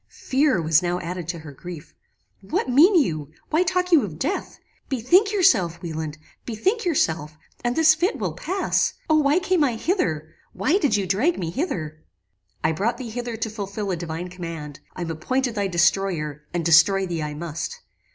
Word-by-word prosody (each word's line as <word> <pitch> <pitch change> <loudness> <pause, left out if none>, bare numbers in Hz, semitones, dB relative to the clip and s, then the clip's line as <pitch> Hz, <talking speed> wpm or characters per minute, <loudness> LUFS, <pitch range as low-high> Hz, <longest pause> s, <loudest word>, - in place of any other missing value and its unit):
"Fear 265 - +1
was 160 +1 +4
now 175 0 -1
added 175 -1 -5
to 170 0 -3
her 155 -2 -10
grief. 165 +2 -10 0.5
'What 195 +6 -2
mean 305 +11 +6
you? 155 - +1 0.2
Why 315 +2 +3
talk 365 +1 0
you 325 -4 +7
of 165 -7 -6
death? 385 - -3 0.3
Bethink 325 - +3
yourself, 225 - +3
Wieland: 160 -2 -4 0.3
bethink 380 - -1
yourself, 160 - 0 0.3
and 240 0 0
this 320 -1 +6
fit 350 +7 0
will - - -2
pass. 380 +3 0 0.2
O 310 - +5
why 290 +2 +3
came 370 -3 +2
I 255 -5 +1
hither! 160 - -1 0.2
Why 340 +8 +2
did 280 - +2
you 200 - -1
drag 215 - +1
me 170 -3 -3
hither?' 155 - -4 0.6
"I 155 - +3
brought 215 +9 -1
thee 235 -3 -6
hither 240 0 -4
to 225 0 -2
fulfil 200 -1 -4
a - - 0
divine 170 +1 -5
command. 165 -5 -7 0.2
I 180 - -4
am 165 - -3
appointed 255 +10 -1
thy 205 -2 -1
destroyer, 170 -5 0
and 175 -2 -2
destroy 175 +4 +5
thee 170 -3 -3
I 150 -1 -4
must." 170 - -5
195 Hz, 180 wpm, -23 LUFS, -, 0.6 s, you